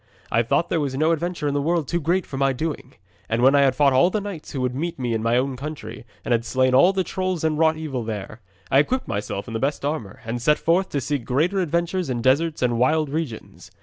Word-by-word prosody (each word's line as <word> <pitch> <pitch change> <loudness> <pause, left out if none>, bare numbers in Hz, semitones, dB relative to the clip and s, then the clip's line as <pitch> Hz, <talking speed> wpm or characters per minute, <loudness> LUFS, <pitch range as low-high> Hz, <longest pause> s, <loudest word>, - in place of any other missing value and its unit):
I 115 - +3
thought 165 +8 0
there 165 - +1
was 135 -3 -2
no 155 +3 +3
adventure 170 -1 -2
in 145 - 0
the 145 - 0
world 165 -1 0
too 170 +3 -1
great 175 +4 +1
for 140 - -8
my 135 0 +2
doing, 155 +4 -5 0.3
and 115 +2 0
when 135 +2 +6
I 140 - +5
had 135 -2 +3
fought 140 -1 +4
all 135 +7 +5
the 215 - -1
knights 200 -6 -7
who 135 - -3
would 125 -1 -1
meet 165 +6 -3
me 125 -3 -2
in 110 - -1
my 115 +2 +2
own 130 +1 0
country, 125 -5 -7 0.2
and - - -3
had 115 -1 +2
slain 130 +1 +1
all 140 +9 +6
the 190 -1 0
trolls 185 -1 -2
that 160 - +2
wrought 160 +1 +2
evil 140 -6 -4
there, 110 +1 -6 0.3
I 135 - +6
equipped 255 - 0
myself 100 -1 -4
in 115 - -7
my 115 - -2
best 140 +3 -1
armour 145 -10 -4
and 115 +2 -3
set 150 +5 +3
forth 180 +3 +1
to 140 - -2
seek 140 -1 -2
greater 160 +12 +1
adventures 170 0 -1
in 120 -2 -2
deserts 150 +4 +2
and 120 -2 +1
wild 155 +4 +2
regions. 150 -7 -5
145 Hz, 255 wpm, -23 LUFS, 125-165 Hz, 0.3 s, when